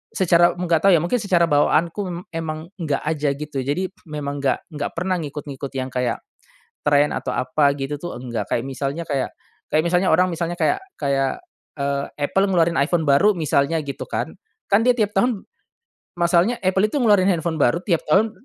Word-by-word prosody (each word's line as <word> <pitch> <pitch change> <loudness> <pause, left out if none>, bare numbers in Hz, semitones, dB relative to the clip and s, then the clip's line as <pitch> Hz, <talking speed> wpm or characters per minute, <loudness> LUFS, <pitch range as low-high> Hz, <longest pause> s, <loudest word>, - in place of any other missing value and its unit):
secara 175 -2 +4
nggak 175 0 +1
tahu - - +7
ya - - +4
mungkin 235 +8 0
secara 180 -5 +3
bawaanku 165 +5 +2
m 175 -1 -4
emang 160 +1 -5
nggak 150 -5 -1
aja 150 -2 0
gitu 145 -1 -5
jadi 175 +8 -2 0.2
memang 145 -2 -4
nggak 140 +5 -1
nggak 145 -1 -3
pernah 180 +1 -1
ngikut-ngikut 145 -2 -6
yang 130 0 -3
kayak, 125 -1 -1 0.7
trend 145 0 +4
atau - - -3
apa 140 +3 +2
gitu 135 +1 -3
tuh 175 - -5
nggak 120 -2 -4
kayak 115 - 0
misalnya 140 +4 -3
kayak 140 -3 -1 0.4
kayak 155 +1 +2
misalnya 180 +2 +2
orang 180 +3 +4
misalnya 170 +1 -2
kayak 385 - +2 0.2
kayak, 135 -2 0 0.4
eee, 140 0 -1 0.2
Apple 195 +5 +2
ngeluarin 170 -3 +2
iPhone 160 +3 +1
baru 170 +10 +5
misalnya 155 0 +1
gitu 140 - -5
kan, - - -3 0.4
kan 200 +3 +5
dia 250 -1 +4
tiap 210 -2 +1
tahun, 210 0 +1 0.8
masalahnya 175 +7 +3
Apple 190 +2 +3
itu - - -3
ngeluarin 205 -5 +4
handphone 165 -2 -1
baru 145 +7 +3
tiap 170 -6 +1
tahun 210 +8 +4
160 Hz, 180 wpm, -22 LUFS, 140-180 Hz, 0.8 s, tahu